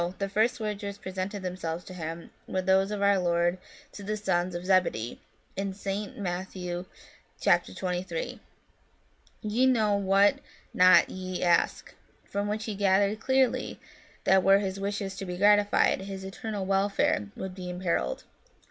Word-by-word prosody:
the 195 - -1
first 220 +5 +1
words 210 -2 -3
which 200 0 -5
presented 190 +1 -4
themselves 175 -2 -4
to 185 - -10
him 165 -1 -6 0.2
were 185 0 -2
those 190 +1 +3
of 205 -1 -2
our 200 -1 +4
Lord 175 0 +1 0.3
to - - -10
the 210 +2 -3
sons 180 -3 0
of 175 +1 -5
Zebedee, 185 - +1 0.4
in 195 0 -3
St. 200 +1 -4
Matt. 185 -1 -3
xx. 175 - -3
23, 185 - -3 0.6
* - - -36
Ye 220 +4 +2
know 215 -5 +3
not 195 +1 +4 0.5
what 185 - +7
ye 185 -1 -5
ask 175 -1 +1 0.2
*; - - -35
from 200 +1 -1
which 215 +1 -2
he 215 - -3
gathered 200 +1 +2
clearly 260 +1 +1 0.4
that 190 0 +5
were 195 +1 +6
his 195 -1 -3
wishes 200 -1 -3
to 195 - -5
be 180 0 -4
gratified, 205 0 +4
his 195 0 -6
eternal 195 +1 -5
welfare 195 - +1
would 190 -1 -5
be 180 -1 -7
imperilled." 180 - -1
195 Hz, 155 wpm, -28 LUFS, 185-205 Hz, 0.6 s, what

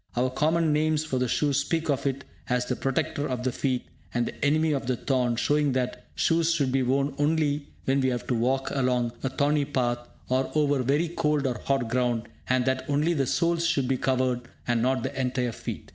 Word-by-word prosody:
Our 125 +1 +1
common 155 +3 +2
names 155 0 +1
for 130 -4 -1
the 125 - +1
shoe 145 +4 +1
speak 155 +4 0
of 140 -1 0
it 135 0 -2 0.3
as 125 0 +1
the 125 - -1
"protector 135 +2 -1
of 125 -1 -2
the 130 - +1
feet" 130 0 -1 0.3
and 120 0 0
the - - -6
"enemy 155 +2 +3
of 135 -4 -1
the 130 - +1
thorn" 125 -2 0
showing 145 +3 +2
that 125 -1 -2
shoes 165 0 +2
should 140 -5 +1
be 135 0 +2
worn 135 +2 +1
only 145 -1 +1 0.2
when 135 +1 +2
we 130 - +2
have 125 -1 -2
to 125 - -1
walk 130 +3 0
along 125 -3 +1
a 135 - -1
thorny 145 +2 +1
path, 125 -4 0 0.3
or 130 +1 +1
over 145 -3 +2
very 145 +7 +1
cold 150 -4 0
or 125 -4 -1
hot 135 -4 +1
ground, 120 -1 0 0.3
and 125 -1 +2
that 130 0 0
only 150 +4 +2
the 135 -5 0
soles 170 +3 +1
should 140 -6 +1
be 135 - +2
covered, 130 -1 +1 0.3
and 120 -2 +2
not 130 0 +1
the 135 - -2
entire 125 -1 0
feet. - - -7
135 Hz, 215 wpm, -27 LUFS, 125-145 Hz, 0.3 s, enemy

